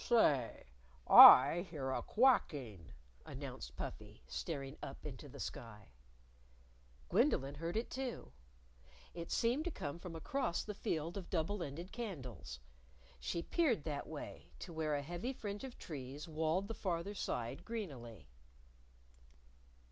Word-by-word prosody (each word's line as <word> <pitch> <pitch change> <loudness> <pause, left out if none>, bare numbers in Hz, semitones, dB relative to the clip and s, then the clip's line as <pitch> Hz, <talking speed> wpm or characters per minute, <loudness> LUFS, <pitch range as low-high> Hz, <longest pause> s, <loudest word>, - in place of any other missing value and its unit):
"Say! 145 - +3 0.4
I 165 +8 +10
hear 135 -5 -3
a - - -1
quacking!" 140 - +1 0.3
announced 65 +1 -8
Puffy, 65 - -7
staring 135 - -5
up - - -8
into - - -8
the - - -11
sky. 105 -3 -7 1.2
Gwendolyn 135 +1 +2
heard 165 +6 -3
it, 230 - -2
too. 255 - -5 0.8
It 170 -1 -7
seemed 245 +6 +1
to - - 0
come 165 - -5
from 175 -2 -8
across 260 - -1
the 210 - -5
Field 170 -4 -3
of 190 - -7
Double 180 +3 -1
Ended 170 +4 -6
Candles. 135 - -6 0.6
She 170 - -3
peered 260 - +1
that 145 -3 -4
way, 155 -2 -8
to 175 - -8
where 155 -2 0
a 145 - -2
heavy 175 - -4
fringe 205 -3 -6
of 265 -2 -8
trees 145 0 -7
walled 160 +4 0
the 225 - -4
farther 185 -1 -2
side 120 - -3
greenily. 135 - -7
165 Hz, 135 wpm, -36 LUFS, 135-205 Hz, 1.2 s, I